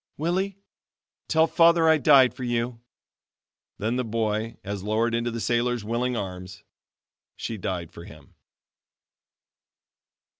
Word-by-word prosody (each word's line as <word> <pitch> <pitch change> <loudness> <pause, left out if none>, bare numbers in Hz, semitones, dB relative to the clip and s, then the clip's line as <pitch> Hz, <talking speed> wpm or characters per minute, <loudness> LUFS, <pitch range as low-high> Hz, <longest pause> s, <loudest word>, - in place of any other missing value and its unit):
"Willie, 185 +5 -1 0.7
tell 160 0 +4
Father 170 0 +4
I 160 -1 +5
died 135 -4 +6
for 130 - -8
you!" 120 -1 -2 1.0
Then 110 +4 -1
the 125 - 0
boy 110 -1 -2
as 100 -1 -5
lowered 110 +3 0
into 115 +1 0
the 115 0 -5
sailor's 120 0 0
willing 120 +2 -1
arms. 90 -1 -7 0.7
She 115 - -5
died 90 -3 -4
for 85 - -11
him. 75 -1 -15
115 Hz, 120 wpm, -25 LUFS, 105-130 Hz, 1.0 s, died